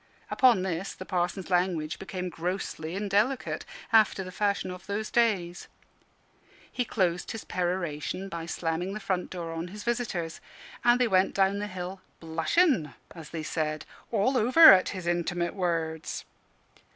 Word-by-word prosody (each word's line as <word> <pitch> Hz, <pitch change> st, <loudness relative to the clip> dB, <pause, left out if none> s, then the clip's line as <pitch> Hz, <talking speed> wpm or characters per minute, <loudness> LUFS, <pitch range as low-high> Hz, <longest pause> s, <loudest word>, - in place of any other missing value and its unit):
Upon 245 Hz, -8 st, +4 dB
this 185 Hz, 0 st, -3 dB
the 185 Hz, -, -8 dB
Parson's 180 Hz, 0 st, -2 dB
language 175 Hz, -4 st, 0 dB
became 185 Hz, -1 st, -4 dB
grossly 170 Hz, -1 st, -4 dB
indelicate, 210 Hz, +6 st, 0 dB, 0.3 s
after 215 Hz, -3 st, +4 dB
the 185 Hz, -, -8 dB
fashion 200 Hz, -1 st, -1 dB
of 180 Hz, +1 st, -10 dB
those 210 Hz, +2 st, -3 dB
days. 190 Hz, -7 st, +1 dB, 1.0 s
He 250 Hz, -, -1 dB
closed 180 Hz, -5 st, 0 dB
his 225 Hz, -, -5 dB
peroration 180 Hz, 0 st, -2 dB
by 170 Hz, -3 st, -6 dB
slamming 175 Hz, +4 st, -2 dB
the -, -, -4 dB
front 185 Hz, -3 st, -2 dB
door 170 Hz, -2 st, -5 dB
on 165 Hz, +1 st, -4 dB
his 205 Hz, +3 st, -9 dB
visitors; 220 Hz, -9 st, -2 dB, 0.4 s
and 240 Hz, +1 st, +5 dB
they 250 Hz, -, +3 dB
went 190 Hz, -2 st, +2 dB
down 195 Hz, +1 st, +2 dB
the 210 Hz, -, -3 dB
hill 185 Hz, 0 st, -6 dB, 0.2 s
"blushing" 165 Hz, -, +1 dB, 0.2 s
(as 160 Hz, -3 st, -10 dB
they 160 Hz, -2 st, -5 dB
said) 155 Hz, -1 st, -2 dB, 0.3 s
"all 235 Hz, +4 st, +2 dB
over, 260 Hz, +8 st, +9 dB
at 185 Hz, -1 st, +3 dB
his 185 Hz, -3 st, -6 dB
intimate 175 Hz, 0 st, -1 dB
words." 165 Hz, -4 st, -2 dB
185 Hz, 150 wpm, -28 LUFS, 170-205 Hz, 1.0 s, over